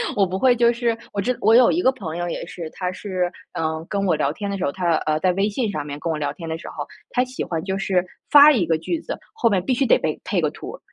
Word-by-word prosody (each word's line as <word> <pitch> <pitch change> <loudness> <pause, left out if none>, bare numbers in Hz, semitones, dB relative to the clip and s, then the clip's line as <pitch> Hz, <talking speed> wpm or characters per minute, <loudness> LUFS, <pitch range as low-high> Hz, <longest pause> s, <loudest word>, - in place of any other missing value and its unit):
我 200 - +3
不 185 +1 -3
会 250 +2 +4
就 235 0 +4
是 235 -1 0 0.2
我 205 - -4
知 245 +5 0
我 220 +2 +5
有 245 0 +6
一 350 - +1
个 260 - +4
朋 175 -9 -6
友 175 0 -2
也 - - -4
是， 165 -3 -7
他 180 -1 -3
是， 185 -2 -2 0.2
嗯， 160 0 -2
跟 200 -1 -1
我 175 - +2
聊 145 -2 0
天 200 +5 -5
的 200 - -2
时 - - -2
候， 140 - 0
他 175 0 +1
呃， 155 0 +1
在 185 - +3
微 195 +3 +1
信 220 0 -1
上 150 -7 -3
面 145 0 -7
跟 165 - -2
我 155 - -2
聊 145 -1 -1
天 165 +1 -9
的 160 - -2
时 165 - -10
候， - - -6 0.2
他 250 - +1
喜 255 +1 -5
欢 165 -2 -3
就 190 0 -2
是， 185 -2 +1 0.2
发 290 +1 +9
一 235 -11 +2
个 160 -1 +1
句 315 - -3
子， - - -6 0.2
后 235 - +2
面 190 -3 +1
必 260 - +1
须 260 - +1
得 - - +5
配- - - -2
配 - - -1
个 - - 0
图， - - -9
190 Hz, 320 characters per minute, -22 LUFS, 165-235 Hz, 0.2 s, 发